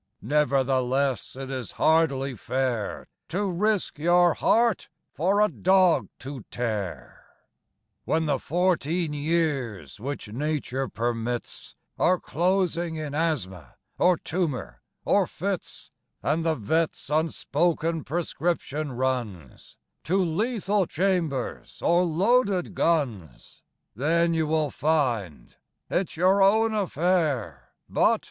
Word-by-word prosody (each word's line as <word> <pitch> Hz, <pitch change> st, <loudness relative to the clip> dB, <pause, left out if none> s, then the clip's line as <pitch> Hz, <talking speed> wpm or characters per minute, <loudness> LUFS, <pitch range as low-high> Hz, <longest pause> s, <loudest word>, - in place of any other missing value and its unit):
Nevertheless 135 Hz, -3 st, +1 dB
it 135 Hz, 0 st, -6 dB
is 130 Hz, -4 st, -5 dB
hardly 140 Hz, -4 st, +2 dB
fair 125 Hz, -2 st, -2 dB, 0.2 s
To 195 Hz, +5 st, -1 dB
risk 205 Hz, -2 st, 0 dB
your 175 Hz, +1 st, +4 dB
heart 230 Hz, -3 st, +2 dB, 0.2 s
for 190 Hz, +6 st, +1 dB
a 210 Hz, -, +5 dB
dog 185 Hz, -3 st, +3 dB
to 135 Hz, -3 st, -8 dB
tear. 100 Hz, -, -4 dB, 0.8 s
When 160 Hz, 0 st, +1 dB
the 150 Hz, -, 0 dB
fourteen 170 Hz, -2 st, 0 dB
years 145 Hz, -, -1 dB
which 135 Hz, +1 st, -5 dB
Nature 135 Hz, +1 st, -2 dB
permits 120 Hz, 0 st, -4 dB, 0.2 s
Are 180 Hz, 0 st, +3 dB
closing 175 Hz, -1 st, 0 dB
in 155 Hz, -2 st, -5 dB
asthma, 135 Hz, -, -2 dB, 0.2 s
or 180 Hz, -1 st, +4 dB
tumour, 160 Hz, -8 st, -3 dB, 0.2 s
or -, -, +3 dB
fits, -, -, -5 dB, 0.3 s
And 155 Hz, +3 st, +1 dB
the 160 Hz, -1 st, +1 dB
vet's 155 Hz, +8 st, -1 dB
unspoken 165 Hz, +1 st, 0 dB
prescription 155 Hz, -2 st, -2 dB
runs 120 Hz, -, -4 dB, 0.3 s
To 185 Hz, +4 st, +1 dB
lethal 195 Hz, +2 st, 0 dB
chambers 170 Hz, -8 st, -1 dB
or 175 Hz, +1 st, +4 dB
loaded 195 Hz, +2 st, +2 dB
guns, 125 Hz, -, -2 dB, 0.3 s
Then 165 Hz, +7 st, +2 dB
you 160 Hz, -1 st, +1 dB
will 155 Hz, -2 st, +1 dB
find 120 Hz, -, -1 dB, 0.4 s
it's 180 Hz, -3 st, -1 dB
your 190 Hz, +3 st, +4 dB
own 220 Hz, +3 st, +4 dB
affair 160 Hz, -, -1 dB
But... -, -, +3 dB
155 Hz, 105 wpm, -26 LUFS, 130-175 Hz, 0.8 s, a